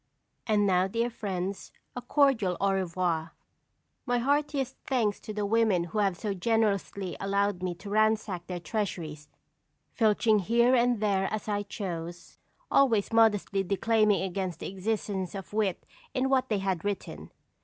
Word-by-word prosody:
And 210 -2 +3
now, 185 -1 +3
dear 230 +4 -1
friends, 195 -3 -4 0.2
a 250 - -4
cordial 245 - +2
au 200 0 +2
revoir. 175 -3 -1 0.7
My 245 0 +2
heartiest 280 0 0
thanks 225 -6 0
to 215 - -8
the 210 -1 -2
women 215 -4 +2
who 175 +5 -3
have 195 -4 +1
so 205 +2 -2
generously 200 -2 0
allowed 200 -1 0
me 180 -1 -2
to 200 +4 -10
ransack 215 -4 +1
their 180 -1 -4
treasuries, 170 -7 -4 0.6
filching 220 -1 +3
here 235 +6 +3
and 240 -3 +3
there 195 -2 +1
as 215 -1 -4
I 205 -1 0
chose, 175 -4 -6 0.3
always 230 -6 +3
modestly 210 -3 +3
declaiming 210 +2 +2
against 185 -2 -3
the - - -4
existence 195 -1 -3
of 195 +1 -8
wit 210 -4 0 0.3
in 260 0 +1
what 260 -1 +2
they 215 - +1
had 190 -3 -2
written. 130 - -4
205 Hz, 150 wpm, -28 LUFS, 185-225 Hz, 0.7 s, And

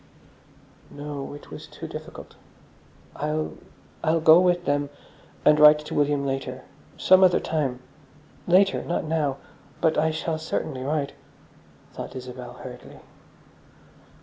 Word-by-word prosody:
No, 145 -1 -7
it 145 - -13
was - - -9
too - - -9
difficult. - - -9 0.8
"I'll—I'll 155 +1 -3
go 160 +1 +7
with 175 -1 +2
them, 145 -1 0 0.6
and 150 0 +6
write 150 0 +9
to 150 0 -8
William 145 -1 +1
later. 130 -1 -4 0.3
Some 185 0 +6
other 180 -1 +5
time. 135 -6 -2 0.7
Later. 190 +3 +4
Not 175 - -2
now. 155 -4 -1 0.4
But 160 -2 +2
I 160 +1 +2
shall 160 0 -2
certainly 155 -3 -3
write," 145 +1 -2 0.8
thought - - -7
Isabel 125 -1 -8
hurriedly. - - -10
150 Hz, 120 wpm, -25 LUFS, 140-160 Hz, 0.8 s, write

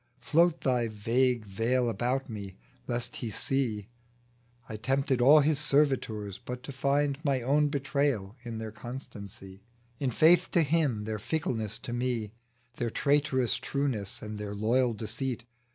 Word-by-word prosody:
Float 170 +6 +3
thy 125 -3 +1
vague 115 +2 +1
veil 115 +5 0
about 125 +5 -1
me, 100 -5 -7 0.3
lest 120 0 -2
He 120 - -4
see 110 -3 -1 0.8
I - - -7
I - - -4
tempted 135 +2 +1
all 145 +5 +8
his 145 0 +2
servitors, 135 -9 +1
but 125 0 -6
to 140 - -6
find 140 +1 +1
My 135 -5 +1
own 145 +4 +3
betrayal 140 -7 -1
in 115 -2 -5
their 110 -1 -5
constancy, 100 -5 -9 0.4
In 135 - 0
faith 170 +8 +5
to 170 - +5
Him 145 -8 +1
their 110 0 -3
fickleness 115 - -2
to 120 - -4
me, 120 -4 -1 0.5
Their 120 - -1
traitorous 140 -1 +1
trueness 130 -9 -2
and 105 0 -6
their 105 -1 -5
loyal 120 +3 +2
deceit. 115 +3 -3
125 Hz, 150 wpm, -29 LUFS, 110-140 Hz, 0.8 s, all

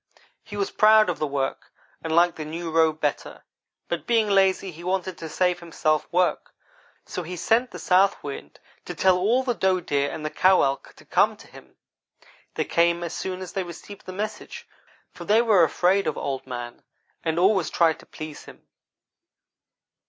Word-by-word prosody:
He 205 - -9
was 200 - -1
proud 215 -2 +5
of 170 - -7
the 155 - 0
work, 135 -1 -3 0.3
and 160 0 -1
liked 175 0 +4
the 155 - -4
new 165 +2 -5
robe 160 -1 +2
better; 145 -2 -3 0.4
but 170 - -4
being 225 -2 +3
lazy, 195 -1 +2
he 170 +1 -12
wanted 185 0 -2
to 160 - -6
save 180 +2 0
himself 155 -2 -1
work, 180 +1 0 0.5
so - - -5
he 180 +2 -6
sent 225 +8 +1
the - - -9
South 190 +2 +3
wind 140 - -8 0.3
to - - -6
tell 190 -1 +4
all 220 +8 +2
the 250 -2 0
doe 190 -4 +1
deer 145 -4 -1
and 155 - -6
the 155 - -2
cow 185 0 +4
elk 135 0 -2
to - - -18
come - - +2
to - - -15
him. - - -16 0.8
They - - -1
came 170 0 +2
as 170 - -5
soon 185 0 -4
as 185 - -8
they 195 - -1
received 180 +3 -10
the - - -5
message, 210 +3 -6 0.4
for - - -10
they 220 +3 +3
were 210 -7 +5
afraid 185 +5 +2
of 155 - -2
Old 135 -1 -4
man 120 -1 -7 0.4
and 160 0 -1
always 185 -2 +3
tried 165 -2 +2
to - - -17
please 155 -1 -9
him. - - -15
175 Hz, 190 wpm, -24 LUFS, 155-190 Hz, 0.8 s, proud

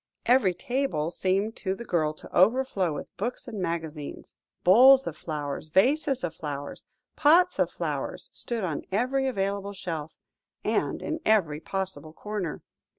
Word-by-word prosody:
Every 240 -8 +4
table 240 - -1
seemed 195 +5 0
to 190 -1 -2
the 235 - -8
girl 155 -6 0
to - - -11
overflow 200 -3 +3
with 145 - -8
books 235 +8 -3
and 220 -5 -5
magazines; 160 -4 -5 0.3
bowls 260 +8 +8
of 155 - -4
flowers, 150 -1 -5
vases 270 - +2
of 170 -2 -2
flowers, 145 -3 -6 0.3
pots 335 +5 +4
of - - +3
flowers, - - -4
stood 235 -3 -3
on 160 -6 -2
every 255 +6 +1
available 200 -3 -2
shelf, 165 -5 -5 0.5
and - - 0
in 315 +1 -2
every 175 -9 +2
possible 185 -2 -5
corner. 205 -3 -4
190 Hz, 145 wpm, -27 LUFS, 160-245 Hz, 0.5 s, bowls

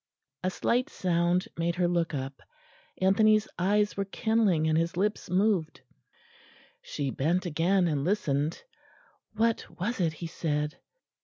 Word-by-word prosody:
'" 135 +2 -56
A 185 - +1
slight 245 +8 0
sound 175 - +1
made 170 +1 0
her 180 -1 +2
look 175 -1 0
up. 135 0 -5 0.6
Anthony's 215 +3 +4
eyes 205 +3 +2
were 200 - -1
kindling 205 -6 +1
and 155 - +2
his 165 +1 0
lips 210 +3 -1
moved; 185 -3 +1 1.0
she 140 -2 -3
bent 170 +9 0
again 175 +3 +2
and 145 -4 0
listened.... 155 -4 0 0.7
What 225 +1 +1
was 220 +7 -2
it 165 -3 +1
he 170 - -7
said?... 150 -1 -2
175 Hz, 140 wpm, -28 LUFS, 160-200 Hz, 1.0 s, Anthony's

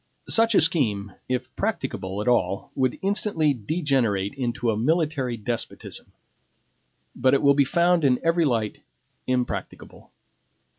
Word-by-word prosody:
Such 225 -1 +3
a - - +6
scheme, 110 - +1 0.2
if 130 0 -3
practicable 115 - -3
at - - -8
all, 120 -5 +1
would 130 -2 0
instantly 195 -6 +1
degenerate 120 - 0
into 120 -3 -1
a - - -1
military 140 -1 0
despotism; 115 +2 -4 1.0
but 130 +2 +3
it - - +1
will 140 0 +6
be 140 0 +4
found 170 +4 +2
in 125 -3 +3
every 165 +1 +2
light 115 -6 -1 0.5
impracticable. 125 -1 -4
130 Hz, 130 wpm, -24 LUFS, 115-160 Hz, 1.0 s, a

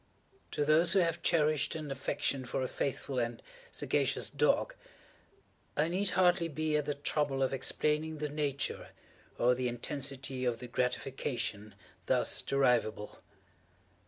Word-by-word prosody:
To 145 - -1
those 165 +3 +5
who 195 - +5
have 170 0 0
cherished 155 -2 +2
an 155 -3 -5
affection 135 0 -1
for 125 +1 -2
a - - -1
faithful 135 0 -2
and 120 -1 -2 0.3
sagacious - - 0
dog, - - +2 1.0
I 155 +2 +2
need 190 +3 +1
hardly 175 -2 +4
be 155 0 -1
at 150 -1 +1
the 145 0 -1
trouble 145 -1 0
of 135 - 0
explaining 150 +4 0
the 150 0 -2
nature 145 -2 -2 0.5
or 125 +1 +4
the 125 0 -1
intensity 135 +1 -3
of 120 -2 +1
the 125 - -8
gratification 120 -4 -2 0.3
thus - - +2
derivable. 120 -6 +1
140 Hz, 135 wpm, -32 LUFS, 125-155 Hz, 1.0 s, those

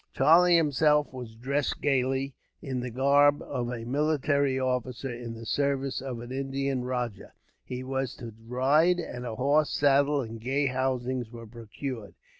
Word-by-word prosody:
Charlie 170 +5 +6
himself 150 -2 +3
was 125 -3 -8
dressed 135 +5 -1
gaily, 135 0 0 0.3
in 130 -2 -4
the 125 0 -4
garb 140 +4 +4
of 120 -1 -3
a 120 -2 -5
military 140 0 +1
officer 125 0 -2
in 120 -1 -7
the 115 0 -9
service 140 +1 -1
of 130 -3 -5
an 120 +1 -9
Indian 135 -1 -2
rajah. 125 -5 -4 0.3
He 125 0 -6
was 130 -1 -3
to 115 -2 -9
ride, 145 +8 +3
and 125 -7 -5
a 110 - -4
horse, 145 +4 +2
saddle, 145 0 +3
and 115 -2 -7
gay 135 +4 0
housings 130 -2 -1
were 115 0 -10
procured. 115 0 -7
130 Hz, 155 wpm, -28 LUFS, 125-140 Hz, 0.3 s, Charlie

